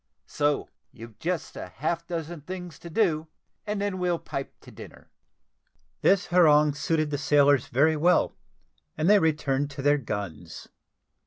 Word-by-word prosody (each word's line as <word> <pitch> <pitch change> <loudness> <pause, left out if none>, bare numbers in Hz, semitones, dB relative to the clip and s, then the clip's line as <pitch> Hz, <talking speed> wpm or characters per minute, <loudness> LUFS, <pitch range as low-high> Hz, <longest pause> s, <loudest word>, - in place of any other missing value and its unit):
So 145 - 0 0.2
you've 115 -2 -13
just 175 0 -3
half 155 - -4
a - - -48
dozen 165 -1 -5
things 180 0 -8
to 170 - -10
do, 160 -4 +1 0.4
and 210 0 -2
then 200 -2 -2
we'll 180 -1 0
pipe 135 -4 -7
to - - -14
dinner." - - -13 0.9
This 195 -1 +3
harangue 150 -4 +4
suited 155 +1 -1
the 145 - -2
sailors 145 -3 +3
very 155 +6 +3
well, 175 +4 +2 0.6
and 155 +2 0
they 205 +1 +6
returned 145 -4 0
to 140 -1 -7
their 145 +1 +3
guns. 95 - -6
155 Hz, 150 wpm, -26 LUFS, 140-175 Hz, 0.9 s, they